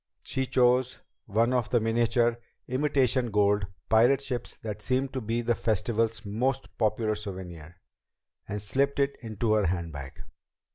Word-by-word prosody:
She 130 -1 -2
chose 125 0 +3 0.3
one 115 +4 +2
of 125 -3 +1
the 120 - +3
miniature 115 +1 +2 0.3
imitation 130 -2 +1
gold 105 -1 +2 0.2
pirate 120 +4 +5
ships 125 -3 -5
that 105 -1 -5
seemed 130 +4 0
to 130 - -2
be 115 +2 -1
the 120 - +2
Festival's 110 0 -1
most 125 +6 -2
popular 110 0 +1
souvenir, 90 -5 -8 0.7
and 105 - -3
slipped 135 +8 0
it 140 0 +1
into 110 -1 -1
her 105 -4 +3
handbag. 80 -6 -4
115 Hz, 140 wpm, -28 LUFS, 105-125 Hz, 0.7 s, pirate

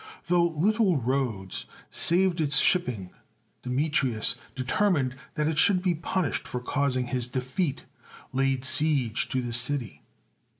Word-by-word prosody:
Though 175 0 +3
little 185 +3 +1
Rhodes 120 -7 -2 0.2
saved 175 0 +2
its 145 -1 +4
shipping, 125 - +1 0.5
Deme 135 +5 -1
trius, 120 -6 +2 0.2
determined 135 - 0 0.2
that 150 0 0
it 160 -1 0
should 185 -1 +3
be 180 -2 +2
punished 170 0 -2
for 125 - -4
causing 130 0 -1
his 125 -1 0
defeat, 130 +6 -3 0.5
laid 135 -1 0
siege 140 -5 +1
to 130 -1 -1
the 120 -1 -4
city. 125 -2 0
140 Hz, 130 wpm, -26 LUFS, 125-170 Hz, 0.5 s, its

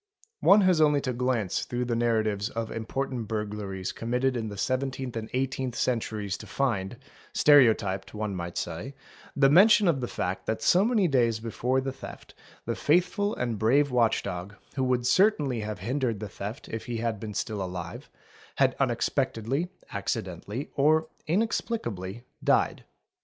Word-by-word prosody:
| 450 0 -49
One 205 +1 +8
has 185 -4 +4
only 150 -2 +4
to 130 - -2
glance 120 -6 0
through 125 0 -2
the 120 -1 -1
narratives 110 -3 +1
of 115 -1 -4
important 120 +1 -3
burglaries 105 -3 -3
committed 125 +3 -1
in 115 -2 -2
the 100 - -8
seventeenth 130 +3 -2
and 110 -1 -4
eighteenth 130 -1 -2
centuries 110 -5 -1
to 105 - -11
find, 110 -3 -1 0.4
stereo 140 -6 +7
typed 95 -1 -5
one 105 -1 -2
might 85 -1 -5
say, 85 +12 -4 0.4
the 140 -1 +5
mention 200 +7 +6
of 145 -6 +2
the 120 - -2
fact 90 -3 -3
that 110 0 -2
so 180 - +5
many 220 -4 +3
days 120 -6 +2
before 125 +3 -1
the 135 0 -3
theft 135 - -11 0.3
the - - -1
faithful 180 +6 +1
and 120 -4 -2
brave 135 +6 +3
watch 120 -3 +2
dog, 95 +1 -5 0.2
who 135 - -1
would 125 -1 +1
certainly 145 - +3
have 105 0 -4
hindered 120 +2 -1
the 105 - -5
theft 105 +6 -7
if 115 +2 -5
he 120 -1 -3
had 115 -2 -2
been 105 0 -6
still 105 -3 -2
alive, 90 -2 -6 0.5
had - - +3
unexpectedly, 135 +10 0 0.2
acciden - - -3
tally, 120 +8 -5
or 155 +3 +3 0.2
inexplicably, 120 - -2 0.2
died. - - +2
120 Hz, 165 wpm, -27 LUFS, 105-135 Hz, 0.5 s, One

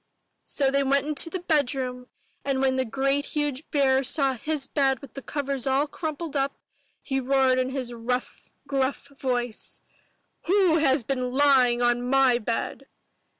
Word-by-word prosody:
'* - - -50
So 275 -2 0
they 275 0 +2
all 270 - -1
went 280 0 +2
into 305 +2 -2
the 370 0 -4
bedroom 265 -6 -1 0.4
and 275 -1 -1
when 265 -1 +2
the 260 0 0
great 275 +4 0
huge 295 -1 -3
bear 270 -3 +3
saw 275 0 +1
his 290 +3 -3
bed 270 -2 +1
with 280 +1 -13
the 275 - -7
covers 275 0 -3
all 270 +2 +2
crumpled 315 0 -5
up, 275 0 0 0.5
he 270 -1 -1
roared 265 0 +2
in 255 0 0
his 260 -3 -4
rough, 245 +2 -4 0.2
gruff 275 +1 -1
voice, 245 -4 -4 0.7
"WHO 370 -3 +4
HAS 270 -3 +2
BEEN 255 0 -2
LYING 260 -4 +4
ON 240 0 +2
MY 265 -2 +4
BED?" 230 0 -3
270 Hz, 165 wpm, -25 LUFS, 255-285 Hz, 0.7 s, WHO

